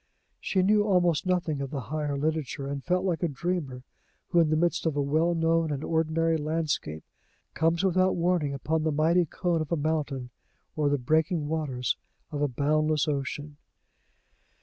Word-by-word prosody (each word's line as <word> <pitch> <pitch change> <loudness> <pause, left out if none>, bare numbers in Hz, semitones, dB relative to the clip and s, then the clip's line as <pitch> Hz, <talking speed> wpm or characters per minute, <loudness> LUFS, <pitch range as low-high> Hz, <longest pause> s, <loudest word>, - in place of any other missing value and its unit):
She 190 -2 +1
knew 210 +2 +4
almost 180 -5 +2
nothing 170 -6 0
of 135 - -3
the 140 0 -4
higher 145 +2 -3
literature, 150 -2 -2
and 140 -1 -4
felt 180 +1 0
like 175 -4 0
a 175 - +2
dreamer 145 -4 -3 0.5
who, 175 - +3
in 165 -2 +4
the 155 - +2
midst 170 +1 +1
of 155 - 0
a 145 - +1
well 160 +5 +2
known 165 -1 +2
and 145 0 -3
ordinary 165 0 +1
landscape, 150 - -2 0.5
comes 165 +2 +1
without 185 0 +3
warning 170 -4 +1
upon 155 +4 -1
the 155 0 0
mighty 165 +4 +3
cone 170 +1 -1
of 155 - -5
a 170 - +2
mountain, 145 -5 -2 0.4
or 150 -3 +1
the 145 - +2
breaking 155 +4 +1
waters 145 -6 -1 0.3
of 145 -1 -3
a 145 - +3
boundless 155 +3 +1
ocean. 145 +1 -3
155 Hz, 170 wpm, -27 LUFS, 145-170 Hz, 0.5 s, knew